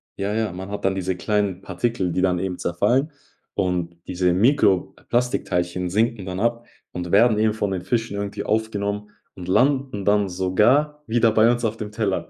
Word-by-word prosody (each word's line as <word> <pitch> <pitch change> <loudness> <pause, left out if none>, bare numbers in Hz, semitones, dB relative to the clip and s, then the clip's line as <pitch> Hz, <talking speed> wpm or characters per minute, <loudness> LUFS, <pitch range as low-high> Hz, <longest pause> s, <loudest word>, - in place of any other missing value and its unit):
ja, 100 +2 -2
ja, 110 -3 0
man 95 +2 -7
hat 100 -1 -5
dann 95 - +2
diese 95 -1 -2
kleinen 100 -1 -1
Partikel, 95 0 -1
die 90 - 0
dann 90 -2 +2
eben 95 -1 -3
zerfallen. 120 - +1 0.4
Und 90 -3 -1
diese 90 -1 +1
Mikroplastikteilchen 95 -5 +1
sinken 110 0 0
dann 95 0 -4
ab 115 +2 -1 0.2
und 90 -1 -5
werden 110 +1 +5
eben 110 0 +2
von 105 -2 -2
den 95 -2 -2
Fischen 115 -4 -1
irgendwie 100 0 -4
aufgenommen 105 -1 -2 0.3
und 90 -1 -9
landen 130 -1 +1
dann 105 -1 +3
sogar 120 +12 +2
wieder 115 0 +3
bei 110 +2 +5
uns 120 -1 -1
auf 110 +1 -2
dem 105 -1 -6
Teller. 105 -3 -2
100 Hz, 175 wpm, -23 LUFS, 95-115 Hz, 0.4 s, werden